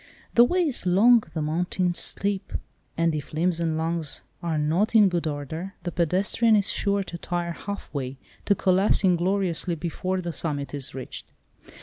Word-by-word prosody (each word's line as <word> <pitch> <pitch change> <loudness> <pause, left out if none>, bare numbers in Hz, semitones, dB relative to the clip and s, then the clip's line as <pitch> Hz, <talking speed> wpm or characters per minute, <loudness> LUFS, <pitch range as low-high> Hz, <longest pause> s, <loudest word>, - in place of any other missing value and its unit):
"The 235 - +7
way 360 +9 +2
is 260 - 0
long, 225 +6 +6
the 155 - -3
mountain 175 +3 0
steep," 200 +2 +2 0.4
and 165 -1 +2
if 150 -1 -5
limbs 170 +2 +1
and 165 -2 -1
lungs 160 -2 -2 0.2
are 165 -3 -1
not 165 +10 +1
in 210 -3 +7
good 175 -2 -1
order, 155 +6 -5
the 175 - -3
pedestrian 190 +7 +2
is 205 -2 +1
sure 200 -1 +1
to 170 -2 -8
tire 175 0 -3
half 200 +2 -7
way, 135 -2 -4 0.3
to 200 - +3
collapse 190 +3 +2
ingloriously 180 -1 +1
before 180 +3 -3
the 175 -2 -4
summit 145 -4 -1
is 140 -2 -5
reached. 130 -2 -8
175 Hz, 165 wpm, -25 LUFS, 160-195 Hz, 0.4 s, The